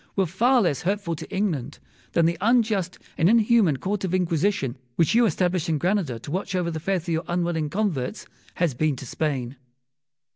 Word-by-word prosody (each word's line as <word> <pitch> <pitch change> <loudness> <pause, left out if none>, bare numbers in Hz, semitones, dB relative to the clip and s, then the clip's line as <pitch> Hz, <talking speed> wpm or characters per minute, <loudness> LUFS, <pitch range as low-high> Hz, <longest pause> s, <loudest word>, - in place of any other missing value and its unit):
were 195 - +2
far 235 +8 +3
less 145 -7 0
hurtful 190 -2 -1
to - - -9
England 190 - -2 0.4
than 170 - +3
the 170 +1 +2
unjust 215 -5 +2 0.2
and 165 - +4
inhuman 220 - +4
Court 195 +6 -3
of 185 -1 0
Inquisition, 165 -6 0 0.2
which 165 - +2
you 235 0 +5
established 180 -2 0
in 160 - +1
Granada 175 - 0
to 120 - -9
watch 185 +2 -2
over 175 -2 0
the 160 - -4
faith 180 +1 -1
of 175 - -7
your 165 0 0
unwilling 170 -3 -1
converts, 170 -9 -2 0.3
has 170 -5 +1
been 150 +3 0
to 130 - -9
Spain. 135 -3 -3
175 Hz, 185 wpm, -24 LUFS, 155-195 Hz, 0.4 s, you